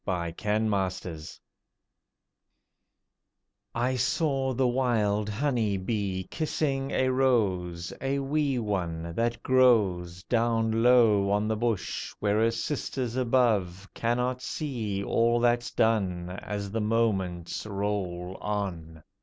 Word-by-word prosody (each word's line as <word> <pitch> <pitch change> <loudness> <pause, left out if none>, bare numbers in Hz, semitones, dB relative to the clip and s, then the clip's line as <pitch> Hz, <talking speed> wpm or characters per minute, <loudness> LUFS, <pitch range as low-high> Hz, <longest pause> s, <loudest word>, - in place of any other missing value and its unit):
A 85 -3 -2
REMINISCENCE 95 -6 -1 2.4
I 125 +2 +1
saw 135 0 0
the 130 +1 +2
wild 110 -5 +1
honey 110 -3 0
bee 95 -2 -2
kissing 140 -3 -1
a 130 -2 +1
rose 95 -10 +1
A 135 +1 0
wee 140 0 0
one, 85 -7 -2
that 115 +5 -1
grows 100 -9 +3
Down 115 -1 +1
low 115 -5 +5
on 105 +1 +1
the 110 - 0
bush, 115 -2 -2
where 105 0 +1
her 115 +1 +4
sisters 125 0 -3
above 110 -7 +1
Cannot 125 +2 -1
see 115 -11 -3
all 115 +3 +2
that's 120 0 +2
done 95 -6 0
As 100 +1 -5
the 110 +1 -1
moments 105 -5 -1
roll 95 -3 -3
on. 85 -6 -4
110 Hz, 110 wpm, -28 LUFS, 95-125 Hz, 2.4 s, low